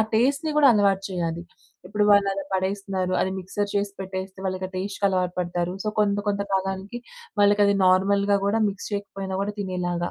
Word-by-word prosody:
టేస్ట్‌ని 275 +7 +2
కూడా 295 -2 +7
అలవాటు 200 -3 +3
చేయాలి. 170 -2 -2 0.4
ఇప్పుడు 210 +2 0
వాళ్ళు 200 -1 +5
అలా 195 0 -4
పడేస్తున్నారు, 190 -1 -1
అది 190 - +1
మిక్సర్ 200 +2 -3
చేసి 200 0 0
పెట్టేస్తే, 190 0 -6
వాళ్ళకి 185 0 -2
ఆ - - -21
టేస్ట్‌కి 195 +2 -3
అలవాటు 180 -2 0
పడతారు. 175 0 -2
సో 215 - 0
కొంత 205 -1 +2
కొంత 200 0 0
కాలానికి 195 +4 -2 0.4
వాళ్ళకి 205 0 +5
అది 200 0 +3
నార్మల్‍గా 200 +2 +3
గూడా 220 +3 +1
మిక్స్ 200 0 -6
చేయకపోయినా 195 -2 -4
గూడా 205 +1 -3
తినేలాగా 175 -2 -2
195 Hz, 170 wpm, -24 LUFS, 185-205 Hz, 0.4 s, కూడా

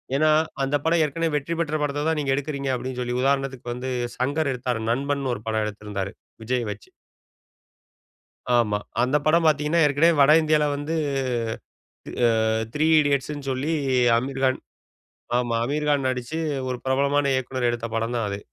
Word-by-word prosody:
ஏனா, 155 +2 +3 0.3
அந்த 135 +2 0
படம் 165 0 +3
ஏற்கனவே 165 +3 -1
வெற்றி 150 +3 -2
பெற்ற 155 -2 -1
படத்த 145 0 -1
தான் 160 -1 +1
நீங்க 140 -2 0
எடுக்கிறீங்க 140 -1 -3
அப்படீன்னு 130 0 -5
சொல்லி, 125 0 -2
உதாரணத்துக்கு 135 -2 -1
வந்து 125 +2 -5 0.3
சங்கர் 140 +3 0
எடுத்தார். 125 -2 -2
நண்பன்னு 140 +1 -1
ஒரு 105 - -9
படம் 110 -1 0
எடுத்திருந்தார். 105 -2 -5 0.3
விஜய 125 +1 -1
வெச்சு. 105 0 -10 1.7
ஆமா. 105 -3 +2 0.3
அந்த 130 +3 +1
படம் 165 +2 +4
பார்த்தீங்கனா, 150 +2 +2
ஏற்கனவே 150 +4 +4
வட 140 +2 +6
இந்தியாவில 155 -1 +2
வந்து, 145 +3 -3 1.2
த் - - -2 0.5
Three 155 +1 +2
Idiotsன்னு 145 0 -1
சொல்லி 135 +4 -1 0.5
அமீர்கான் 130 +1 0 0.8
ஆமா. 120 -1 0
அமீர்கான் 145 0 0
நடிச்சு 130 +5 -3 0.3
ஒரு 125 - -2
பிரபலமான 140 +1 +2
இயக்குனர் 130 -1 -1
எடுத்த 120 -1 -3
படம் 115 +2 -1
தான் 115 -2 0
அது. 100 - -4
135 Hz, 145 wpm, -24 LUFS, 125-150 Hz, 1.7 s, வட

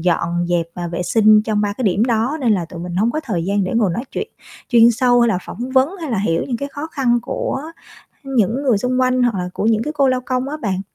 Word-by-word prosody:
dọn 175 0 0
dẹp 170 -2 0
và 175 -1 -4
vệ 170 +1 -3
sinh 215 +2 +4
trong 215 -1 -1
3 205 -1 0
cái 255 - -6
điểm 200 +2 +2
đó. 240 +5 0
Nên 240 -5 +2
là 180 -5 0
tụi 170 +1 -9
mình 175 0 -5
hông 220 +5 +2
có 310 - -2
thời 180 -9 -2
gian 200 0 0
để - - -3
ngồi 220 -5 +2
nói 235 - -3
chuyện - - -4 0.4
chuyên 235 -1 +6
sâu 245 +1 +3
hay 235 - +4
là 185 - +1
phỏng 245 +3 -6
vấn 260 +1 +4
hay 305 - -4
là 225 - 0
hiểu 165 -4 0
những 245 - -1
cái 280 +4 -5
khó 285 +2 -6
khăn 260 -6 +1
của 265 +2 -3 0.6
những 255 -1 0
người 250 -6 +3
xung 255 +4 0
quanh, 255 0 +2
hoặc 240 -4 +1
là 180 0 -3
của - - -3
những 220 0 +2
cái 300 +4 -4
cô 275 -2 +3
lao 255 -1 +1
công 255 +1 -2
á 305 - -4
bạn. 190 -4 -1
230 Hz, 275 wpm, -19 LUFS, 190-255 Hz, 0.6 s, chuyên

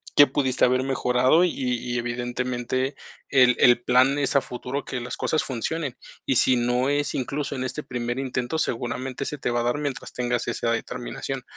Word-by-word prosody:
qué 145 - +8
pudiste 130 -1 +2
haber 130 +1 +2
mejorado 130 +4 +3
y 180 - +3
y 125 -1 -2
evidentemente, 120 +2 -2 0.4
el 125 -2 +5
el 120 0 +6
plan 130 +3 +3
es 140 0 0
a 140 - +5
futuro 125 +3 -5
que 125 - -4
las 120 0 -5
cosas 155 - 0
funcionen. 135 +2 -3 0.3
Y 135 - +1
si 125 +1 +4
no 125 +2 +1
es 145 0 0
incluso 140 +2 -2
en 130 - -3
este 140 +3 -4
primer 120 +1 -3
intento, 130 +2 -2
seguramente 130 +2 -2
se 150 - -4
te 125 - -2
va 120 0 +1
a - - -1
dar 120 +4 0
mientras 145 -3 -4
tengas 120 -1 -1
esa 115 0 -1
determinación. 125 +3 -4
125 Hz, 185 wpm, -25 LUFS, 120-135 Hz, 0.4 s, qué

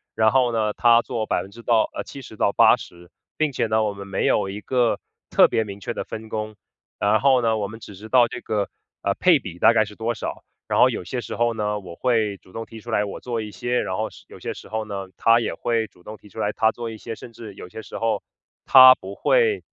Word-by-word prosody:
然 110 0 +4
后 125 -3 +2
呢， 110 -2 +1
她 120 +1 +4
做 115 -2 -3
70%-80% 110 -4 0 0.2
并 155 -2 0
且 125 - -1
呢， 110 0 +1
我 105 -1 -1
们 100 0 -9
没 95 - -1
有 - - +2
一 105 +2 -6
个， 125 -1 +1 0.3
特 - - +5
别 110 - 0
明 100 -1 -9
确 - - -4
的 - - -5
分 110 0 -8
工。 110 0 -4 0.4
然 105 +2 +3
后 135 -2 +4
呢， 115 -1 +1
我 100 -2 -2
们 110 +2 -10
只 100 - -11
知 105 +3 -10
道 120 0 +5
这 125 - -6
个， 105 -4 -2 0.3
呃， 100 - 0
配 180 -3 +5
比 90 -7 -9
大 - - +6
概 110 - +4
是 105 -1 -10
多 115 +2 -2
少， - - -6 0.2
然 - - +1
后 - - +7
有 - - -4
些 125 - -4
时 115 - -6
候 120 0 +1
呢， 105 -1 -2
我 90 -4 -10
会 110 -4 0
主 95 - -22
动 115 - -5
提 115 - -11
出 120 +2 -9
来 105 -2 +2
我 100 - -6
做 120 -2 -3
一 105 -1 -7
些， 120 +3 -1
然 95 - -3
后 110 +1 -2
是 - - -16
有 - - -12
些 - - -4
时 - - -13
候 110 +1 -3
呢， 100 -2 -6
她 115 +1 +4
也 - - -2
会 115 -2 -1
主 90 - -24
动 110 - -8
提 105 - -18
出 - - -11
来 105 - -1
她 110 +1 +2
做 120 0 -6
一 110 - -8
些， 115 +2 -7
甚 115 - -12
至 110 -3 -10
有 - - -9
些 110 +5 -9
时 - - -9
候， 115 -2 -1 0.4
她 130 -1 +9
不 95 +1 -9
会 460 -4 +2
110 Hz, 260 characters per minute, -23 LUFS, 105-120 Hz, 0.4 s, 她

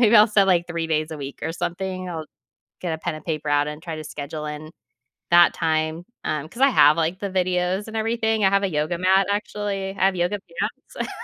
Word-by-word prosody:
maybe 230 -1 +6
I'll 210 - +8
set, 200 -2 +4
like, 175 -2 +3
3 170 -1 -2
days 155 0 0
a 155 - -6
week 140 0 -7
or 160 - -2
something. 185 +2 -4
I'll 160 -2 -5 0.5
get 175 -3 -2
a - - -6
pen 175 0 -3
and 155 - -12
paper 155 -3 -3
out 145 0 +2
and 150 +1 -7
try 165 -3 -5
to 155 - -7
schedule 150 +1 -6
in 150 +1 -6 0.6
that 175 0 +7
time, 160 +1 -1 0.2
um, 155 -1 -2
'cause 240 - -12
I 275 - +8
have, 150 - +6
like, 165 +3 0
the 200 -1 -3
videos 185 +2 0
and 220 - -6
everything. 220 -1 +1
I 190 - +5
have 200 0 +3
a 195 - +1
yoga 155 +1 -1
mat, 190 +1 +4
actually. 205 -1 -2
I 195 -1 -1
have 190 -1 +3
yoga 175 +4 0
pants. 170 -2 -5
175 Hz, 230 wpm, -23 LUFS, 155-195 Hz, 0.6 s, I'll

